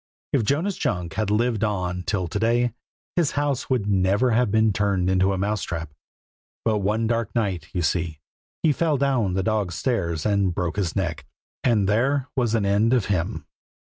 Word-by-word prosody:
If - - +4
Jonas 160 - 0
Junk 90 -2 -2
had 110 0 -1
lived 115 +1 +1
on 90 -4 -1
till 90 -1 -1
to 105 - -3
day, 120 +1 +2 0.4
his 170 -5 +1
house 145 -3 -1
would 125 -6 +1
never 100 +5 +2
have 115 0 +2
been 110 0 +3
turned 95 -2 +1
into 95 +1 +3
a 95 - -1
mouse 100 +2 -1
trap; 80 -3 -4 0.7
but 110 -2 +2
one 105 +3 0
dark 115 -2 -1
night, 95 -8 -1
you 90 -2 -1
see, 80 -1 -1 0.4
he 160 - +5
fell 155 -1 +1
down 125 -9 +1
the 95 - 0
dog's 105 -4 0
stairs 85 - -1
and 100 -4 +1
broke 90 +1 -2
his 90 -6 -1
neck, 85 -5 -2 0.4
and 110 -6 +3
there 130 +6 +1
was 120 -4 +1
an 110 -3 +1
end 105 +4 +3
of 120 -6 +2
him. 85 -1 -2
105 Hz, 185 wpm, -24 LUFS, 95-120 Hz, 0.7 s, he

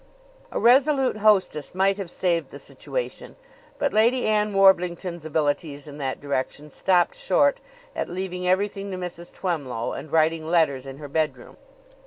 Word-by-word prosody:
A - - -2
resolute 265 0 +4
hostess 200 -7 +2
might 195 +1 +2
have 195 -4 -5
saved 175 -1 0
the - - -10
situation; - - -6 0.4
but 285 - 0
Lady 235 +4 +3
Ann 210 -1 +2
Warblington's 180 -3 +2
abilities 145 -1 -1
in 145 -1 -10
that 135 -2 -3
direction 140 +1 -4
stopped 175 +1 +2
short 285 +9 +2 0.4
at - - -3
leaving 180 0 -4
everything 200 +1 0
to 185 - -4
Mrs. 175 -1 -7
Twemlow 140 -11 -3
and 155 - -8
writing 160 0 +2
letters 145 -6 +2
in 135 0 -8
her 145 0 -8
bedroom. 155 +2 -2
180 Hz, 150 wpm, -24 LUFS, 155-200 Hz, 0.4 s, resolute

